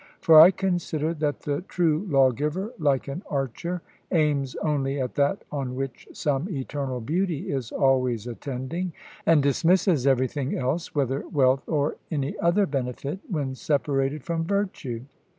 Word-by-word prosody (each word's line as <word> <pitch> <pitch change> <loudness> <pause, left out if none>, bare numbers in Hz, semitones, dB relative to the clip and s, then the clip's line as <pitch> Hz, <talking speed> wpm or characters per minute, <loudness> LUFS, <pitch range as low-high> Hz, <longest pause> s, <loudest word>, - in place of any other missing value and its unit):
For 160 -1 +8
I 170 - +10
consider 175 -5 -1
that 150 -2 -2
the 145 +1 -2
true 175 0 0
lawgiver, 150 - +1
like 140 -4 +1
an 140 +6 -4
archer, 150 +6 -3 0.3
aims 145 -5 +1
only 140 -2 -1
at 125 -2 -2
that 140 0 +1
on 135 -3 -3
which 135 -2 -5
some 145 +5 -1
eternal 135 -4 -3
beauty 165 +5 -1
is 130 -5 -3
always 125 -4 +2
attending, 135 +8 -4 0.3
and 160 -4 +5
dismisses 165 0 +3
everything 130 +1 +1
else, 135 +7 -2
whether 135 -1 0
wealth 135 -1 +2
or 150 -2 0
any 145 -3 -2
other 175 +4 +3
benefit, 140 +2 -3
when 145 -8 -2
separated 140 0 0
from 165 -1 -1
virtue. 165 - -2
145 Hz, 140 wpm, -25 LUFS, 135-165 Hz, 0.3 s, I